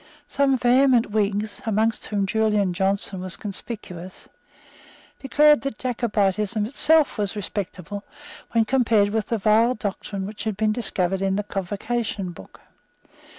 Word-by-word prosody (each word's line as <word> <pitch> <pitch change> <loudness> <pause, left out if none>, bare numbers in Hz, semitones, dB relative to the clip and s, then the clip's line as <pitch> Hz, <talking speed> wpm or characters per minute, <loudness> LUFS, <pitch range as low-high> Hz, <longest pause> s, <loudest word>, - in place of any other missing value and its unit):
Some 275 -1 +2
vehement 245 -2 +3
Whigs, 205 0 -1
among 220 +1 +2 0.2
whom 205 -2 0
Julian 210 -2 +1
Johnson 190 0 0
was 185 -1 -3
conspicuous, 190 -4 -6 0.9
declared 295 +2 +4
that 275 -4 -4
Jacobitism 215 -4 0
itself 295 +2 +3
was 205 0 0
respectable 200 -1 -5 0.5
when 230 -1 +3
compared 225 -5 +3
with 220 0 -2
the 230 - -1
vile 220 +4 +3
doctrine 200 -2 -4
which 210 +2 -7
had 215 -3 -2
been 215 0 +1
discovered 195 -5 0
in 195 0 +1
the 205 - -1
Convocation 205 0 -3
Book. 130 - -14
210 Hz, 130 wpm, -23 LUFS, 195-235 Hz, 0.9 s, declared